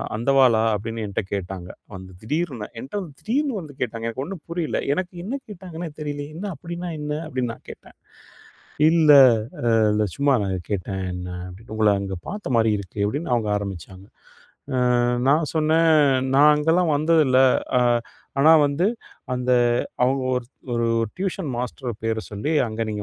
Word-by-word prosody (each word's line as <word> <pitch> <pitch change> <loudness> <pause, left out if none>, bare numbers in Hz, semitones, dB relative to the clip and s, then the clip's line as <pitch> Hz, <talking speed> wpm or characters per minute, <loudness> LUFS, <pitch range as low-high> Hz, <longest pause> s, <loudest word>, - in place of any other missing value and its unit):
அந்தவாளா?" 120 -1 +4
அப்டின்னு 115 +2 -4
என்ட்ட 100 - -2
கேட்டாங்க. 95 -2 -5 0.2
வந்து 95 0 -9
திடீர்னு. 140 -2 -3
என்ட்ட 135 - -6 0.2
திடீர்னு 275 +4 -1
வந்து 155 -5 -10
கேட்டாங்க. 115 -2 -3
எனக்கு 120 +3 -4
ஒண்ணும் 175 +2 -7
புரியல. 170 -2 -2
எனக்கு 185 +1 -3
என்ன 225 +8 -3
கேட்டாங்கன்னே 175 -4 -7
தெரியலையே, 145 -1 -4
"என்ன 185 +5 -6
அப்படின்னா 170 +4 -6
என்ன?" 150 0 -3
அப்படின்னு 130 -4 -2
நான் - - -17
கேட்டேன் - - -13 0.9
"இல்லை 155 -3 +6 0.7
இல்லை 105 0 +1
சும்மா 140 -1 +3
நான் 95 -1 -2
கேட்டேன்." 95 -1 -3
என்ன 90 0 -6 0.2
அப்படின், 95 +5 -13
"உங்களை 110 -2 +4
அங்கே 95 -1 -4
பார்த்த 205 -9 -4
மாரி 110 -1 +3
இருக்கு" 100 +1 -8
அப்படின்னு 140 +5 -3
அவங்க 110 -3 -1
ஆரம்பிச்சாங்க. 95 -1 -7 1.0
அ - - +2 0.3
நான் 150 0 +2
சொன்னேன், 160 +1 +3 0.5
"நான் 150 +2 +7
அங்கேலாம் 160 +3 +2
வந்ததில்லை". 145 -4 +4 0.3
அ - - +4 0.6
ஆனா 155 +3 +6 0.2
வந்து, 145 +7 0 0.5
அந்த 125 0 -2 0.5
அவங்க 135 +2 +1 0.2
ஒரு 125 - -3 0.3
ஒரு 115 0 +1 0.3
டியூஷன் 190 -5 -3
மாஸ்டர் 125 -1 -4
பேரை 110 0 0
சொல்லி, 105 +9 -3 0.2
"அங்கே 110 +1 -3
நீங்க 105 -1 -4
130 Hz, 150 wpm, -23 LUFS, 110-160 Hz, 1.0 s, நான்